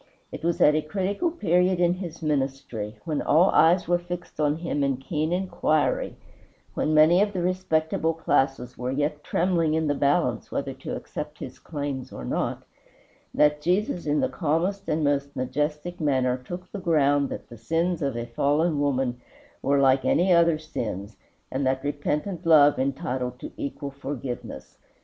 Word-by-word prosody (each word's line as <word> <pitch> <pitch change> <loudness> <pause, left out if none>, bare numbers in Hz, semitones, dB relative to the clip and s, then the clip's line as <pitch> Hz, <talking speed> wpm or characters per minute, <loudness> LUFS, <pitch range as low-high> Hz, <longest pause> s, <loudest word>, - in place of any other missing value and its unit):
It - - -8
was 170 0 0
at 150 - +7
a 155 - +2
critical 195 - -1
period 180 - +2
in 175 0 +3
his 175 -3 -7
ministry, 135 -7 -2
when 155 -3 -1
all 170 +5 +4
eyes 170 +2 +4
were 175 0 +2
fixed 175 -2 -7
on 150 0 +2
him 165 -4 -2
in 135 -2 +1
keen 155 +4 -2
inquiry, 180 -4 0 0.6
when 155 - 0
many 160 +5 +6
of 205 0 +1
the 180 -2 -2
respectable 165 -3 0
classes 135 -5 0
were 125 0 -2
yet 145 +2 -1
trembling 170 -3 +1
in 160 0 +1
the 145 - +1
balance 140 0 +1
whether - - -2
to - - -6
accept - - -6
his - - -8
claims 140 -4 -5
or 60 - -7
not, - - -2 0.7
that 150 0 +3
Jesus 180 -1 0
in 150 0 +2
the - - +2
calmest 180 +5 -1
and 155 0 +1
most 140 -1 0
majestic 150 +6 -2
manner 130 -4 +2
took 175 +8 -8
the 205 - -5
ground 145 -5 +2
that - - -7
the 120 - -11
sins 165 +8 0
of 140 -4 -1
a 120 - -3
fallen 145 +6 +1
woman 130 -3 0 0.4
were 140 0 +2
like 135 -1 +4
any 180 +2 +3
other 170 -2 +4
sins, 110 - -5 0.4
and 135 +2 -1
that 130 0 0
repentant 150 +5 -2
love 150 -4 +6
entitled 130 -2 -2
to - - -7
equal 140 0 -5
forgiveness. 135 -3 -7
150 Hz, 170 wpm, -25 LUFS, 140-170 Hz, 0.7 s, at